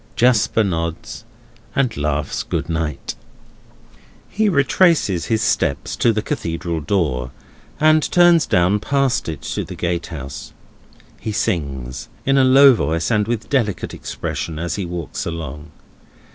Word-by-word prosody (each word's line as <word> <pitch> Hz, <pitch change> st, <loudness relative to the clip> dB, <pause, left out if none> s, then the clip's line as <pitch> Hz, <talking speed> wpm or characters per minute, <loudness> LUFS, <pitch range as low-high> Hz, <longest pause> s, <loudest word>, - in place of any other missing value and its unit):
Jasper 115 Hz, -2 st, +3 dB
nods, 85 Hz, -4 st, -4 dB, 0.5 s
and 130 Hz, -4 st, +1 dB
laughs 75 Hz, -1 st, -2 dB
good 85 Hz, -, -3 dB
night! 80 Hz, -3 st, -3 dB, 1.1 s
He 215 Hz, 0 st, +1 dB
retraces 140 Hz, -, +3 dB
his 110 Hz, -1 st, +1 dB
steps 70 Hz, -, 0 dB
to 115 Hz, -, +3 dB
the 105 Hz, -1 st, -1 dB
Cathedral 85 Hz, 0 st, -3 dB
door, 70 Hz, -8 st, -1 dB, 0.5 s
and 155 Hz, 0 st, +5 dB
turns 175 Hz, -2 st, +5 dB
down 90 Hz, +4 st, +3 dB
past 135 Hz, -2 st, 0 dB
it 80 Hz, -, -6 dB
to -, -, -3 dB
the -, -, -8 dB
gatehouse. 85 Hz, -6 st, -4 dB, 0.7 s
He 110 Hz, -, -4 dB
sings, 70 Hz, -, -3 dB, 0.2 s
in 135 Hz, 0 st, +3 dB
a -, -, +5 dB
low 135 Hz, +1 st, +7 dB
voice 85 Hz, -7 st, -1 dB
and 105 Hz, -1 st, +2 dB
with 115 Hz, -1 st, -2 dB
delicate 115 Hz, -9 st, -1 dB
expression, 80 Hz, -2 st, -5 dB
as 85 Hz, +1 st, -3 dB
he 100 Hz, -, -3 dB
walks 85 Hz, -2 st, -5 dB
along. 80 Hz, -2 st, -6 dB
90 Hz, 130 wpm, -20 LUFS, 80-125 Hz, 1.1 s, low